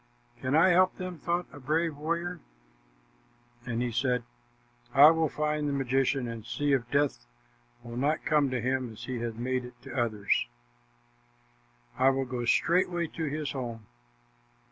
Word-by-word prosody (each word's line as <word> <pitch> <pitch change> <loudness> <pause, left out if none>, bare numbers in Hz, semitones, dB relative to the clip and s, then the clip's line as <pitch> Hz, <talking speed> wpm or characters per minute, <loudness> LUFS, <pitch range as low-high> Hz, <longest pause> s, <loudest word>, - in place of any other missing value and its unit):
"Can 130 +3 0
I 165 +4 +6
help 185 +1 +4
them?" 185 -2 -6
thought 175 +3 -1
a - - -10
brave 155 +4 0
warrior, 170 +4 -3 1.3
and 120 0 -1
he 125 - -2
said, 125 +1 0 0.7
"I 145 +3 +10
will 160 -1 +1
find 150 0 -1
the - - -1
magician, 135 -1 +1
and 115 -2 -6
see 145 +5 -1
if 120 -3 0
death 140 - 0 0.6
will 120 0 -7
not 145 +4 0
come 150 -4 +3
to 130 -1 -1
him 130 -1 -1
as 110 - -11
he 130 -2 -4
has 115 -1 -3
made 125 +2 -1
it 125 0 -10
come - - -9
to 125 - +1
others. 105 - 0 1.5
I 130 - +6
will 135 0 0
go 125 -1 -4
straightway 175 +4 +2
to 160 - -4
his 150 0 -3
home." 120 -5 -5
135 Hz, 165 wpm, -29 LUFS, 125-155 Hz, 1.5 s, I